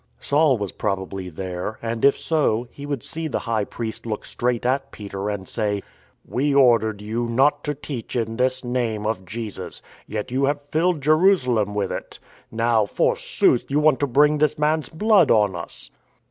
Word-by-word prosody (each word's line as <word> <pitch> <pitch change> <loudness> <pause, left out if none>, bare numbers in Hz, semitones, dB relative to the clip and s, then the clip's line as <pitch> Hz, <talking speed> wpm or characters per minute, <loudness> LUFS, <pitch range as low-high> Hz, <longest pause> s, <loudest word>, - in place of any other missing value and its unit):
Saul 145 -2 +3
was 100 -3 -4
probably 95 -2 -3
there, 90 +4 -5
and, 115 0 -4
if 140 - +5
so, 125 -7 0
he 145 0 -9
would 140 -5 -3
see 160 0 -4
the 150 - -2
High 110 -3 0
Priest 115 +1 -6
look 110 -2 -4
straight 120 -1 -1
at 135 +2 0
Peter, 100 -1 -5
and 100 -2 -4
say: 105 -3 -1 0.2
" - - -36
We 140 +3 0
ordered 110 -6 +4
you 115 +3 -2
not 140 +5 +2
to 150 0 -1
teach 135 -5 -7
in 115 -2 -1
this 130 +1 +1
Name 120 -4 -1
(of 105 -4 -2
Jesus). 110 +2 -6 0.2
Yet 110 +3 -4
you 135 +2 +2
have 145 +1 -1
filled 165 0 +1
Jerusalem 140 - +3
with 100 -2 -1
it. - - -6 0.3
Now, 115 -2 +2
forsooth, - - +1
you 140 +2 +2
want 150 -3 +4
to 145 - +1
bring 145 +4 +4
this 150 0 +2
man's 150 -1 +1
blood 200 -1 +4
on 105 -4 +3
us." 85 -1 -7
120 Hz, 180 wpm, -23 LUFS, 105-145 Hz, 0.3 s, if